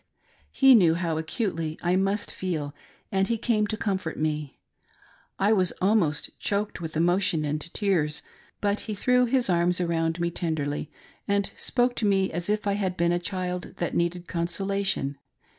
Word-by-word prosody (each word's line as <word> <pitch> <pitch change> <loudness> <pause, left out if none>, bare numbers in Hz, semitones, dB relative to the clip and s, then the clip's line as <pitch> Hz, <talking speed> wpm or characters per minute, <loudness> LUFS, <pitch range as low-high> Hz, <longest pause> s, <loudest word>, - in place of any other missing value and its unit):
He 270 -1 +6
knew 175 -8 +6
how 165 -2 -1
acutely 165 -2 -2
I 175 +1 +2
must 195 +2 0
feel, 155 -6 -3 0.4
and 195 -1 +2
he 230 - 0
came 215 -2 +1
to 215 - -3
comfort 190 -6 -2
me. 150 -2 -2 0.8
I 205 +3 +3
was 185 -4 +2
almost 185 -7 0
choked 205 -2 -2
with 160 -1 -4
emotion 175 -1 +2
and 150 +1 -2
tears, 165 -8 +1 0.4
but 205 0 +1
he 210 - -1
threw 250 +4 +3
his 250 0 +2
arms 175 0 +2
round 165 -1 0
me 170 0 0
tenderly 155 -4 -2 0.4
and 200 0 +1
spoke 245 -1 +1
to 215 - +2
me 195 -1 +2
as 175 +3 -3
if 210 0 0
I 200 - +2
had 190 -3 -1
been 170 0 +2
a 175 - +1
child 180 0 -4
that 175 - -2
needed 175 +1 -1
consolation. 175 -4 -1
180 Hz, 165 wpm, -26 LUFS, 165-200 Hz, 0.8 s, He